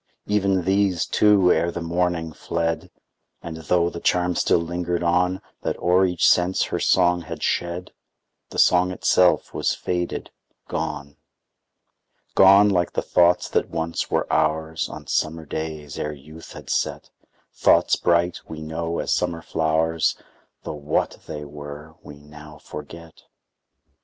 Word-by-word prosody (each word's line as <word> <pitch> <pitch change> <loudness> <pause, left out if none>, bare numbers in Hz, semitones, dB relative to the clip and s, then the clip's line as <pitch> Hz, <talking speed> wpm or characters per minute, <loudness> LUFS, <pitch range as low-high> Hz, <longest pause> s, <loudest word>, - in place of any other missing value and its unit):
Even 100 -3 +1
these, 95 -2 +2
too, 100 -4 +4
ere 85 +2 +1
the 85 - -5
morning, 85 -1 -1
fled; 85 +2 -2 0.5
And, 80 -1 -6
tho' 85 +2 +1
the 85 - -7
charm 90 0 +1
still - - +2
lingered 85 +1 -2
on, 90 +2 +1 0.2
That - - -2
o'er 90 +2 +3
each 90 -2 +2
sense 90 +1 +3
her - - -3
song 90 -1 +3
had 80 - -7
shed, 85 +1 -2 0.6
The - - -9
song 90 0 +4
itself 90 0 +2
was - - 0
faded, 90 -1 -3 0.4
gone; 70 0 -4 1.2
Gone, 100 +2 +7
like 90 -3 0
the - - -1
thoughts 90 0 +3
that - - 0
once 80 0 -3
were - - 0
ours, 80 +1 0
On - - -9
summer 80 +1 -1
days, 75 -1 -5
ere 75 - -3
youth 75 +3 -13
had - - -8
set; - - -2 0.4
Thoughts - - +4
bright, 85 0 +1
we 80 - -8
know, 80 +2 -4
as - - -2
summer 85 -1 -1
flowers, 80 +1 0 0.5
Tho' - - -5
what 75 0 -2
they 75 0 -6
were 75 +1 -9
we 75 - -11
now 75 +1 -13
forget. 80 +2 -11
85 Hz, 140 wpm, -23 LUFS, 80-90 Hz, 1.2 s, Gone